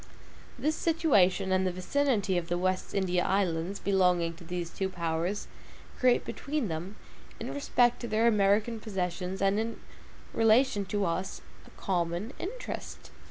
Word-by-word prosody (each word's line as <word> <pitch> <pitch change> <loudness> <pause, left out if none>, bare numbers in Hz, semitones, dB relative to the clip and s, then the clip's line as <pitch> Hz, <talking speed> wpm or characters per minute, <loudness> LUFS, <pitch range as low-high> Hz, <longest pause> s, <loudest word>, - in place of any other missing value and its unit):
This 310 +2 0
situation 205 - +3
and 185 0 +2
the - - 0
vicinity 205 +1 0
of 175 -1 -1
the 175 - 0
West 185 +1 -1
India 180 -2 +1
Islands, 190 -1 0
belonging 180 -4 +2
to 170 - -12
these 175 0 -4
two 190 -1 -2
powers 170 +2 -2 0.5
create 250 -1 +3
between 280 -7 -3
them, 170 +6 -5 0.4
in - - -5
respect 245 -4 +2
to 240 - -4
their 220 +1 +2
American 215 +1 +3
possessions 190 -2 -3
and 195 +2 +3
in 225 +1 -3 0.5
relation 225 -1 +3
to 200 +1 -1
us, 185 +3 -2 0.3
a - - -14
common 175 +5 -1
interest. - - -6
195 Hz, 145 wpm, -29 LUFS, 180-225 Hz, 0.5 s, situation